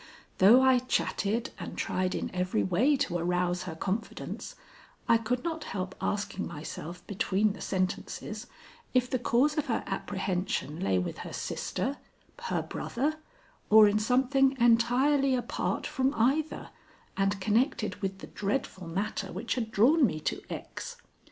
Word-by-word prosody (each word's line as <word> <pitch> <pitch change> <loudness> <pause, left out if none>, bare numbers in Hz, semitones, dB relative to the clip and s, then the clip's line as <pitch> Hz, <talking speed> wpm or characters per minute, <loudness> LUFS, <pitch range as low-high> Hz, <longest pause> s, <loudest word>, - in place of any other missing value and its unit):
Though 230 +7 +8
I 260 -1 +6
chatted 235 -1 -1
and - - -7
tried 185 0 -1
in - - -3
every 180 - 0
way 265 - +3
to 175 -8 -1
arouse 180 +1 0
her 165 -3 -5
confidence, 200 +6 -4 0.5
I 230 - +5
could 245 +2 -1
not 325 -2 -3
help 185 -1 -4
asking 200 -1 -2
myself 170 +2 -7
between 205 0 +1
the - - -11
sentences, 185 -1 -3 0.5
if 250 0 +4
the 255 - -1
cause 270 +6 +2
of 300 - -2
her 230 - 0
apprehension 190 -5 -2
lay 95 - +1
with 90 - -3
her - - -7
sister, 275 +3 -3 0.5
her - - -1
brother, 295 +6 -2 0.5
or 215 0 +9
in 205 +1 +2
something 265 +4 +3
entirely 250 +4 +4
apart 245 - -2
from 265 -1 0
either, 275 +7 0 0.4
and 195 0 +1
connected 215 -1 +1
with 195 -1 -2
the - - -6
dreadful 200 -4 -3
matter 195 +2 -3
which - - -2
had 230 -3 -2
drawn 270 +10 +4
me 160 -11 +2
to - - -2
X. - - -6
215 Hz, 145 wpm, -29 LUFS, 185-255 Hz, 0.5 s, or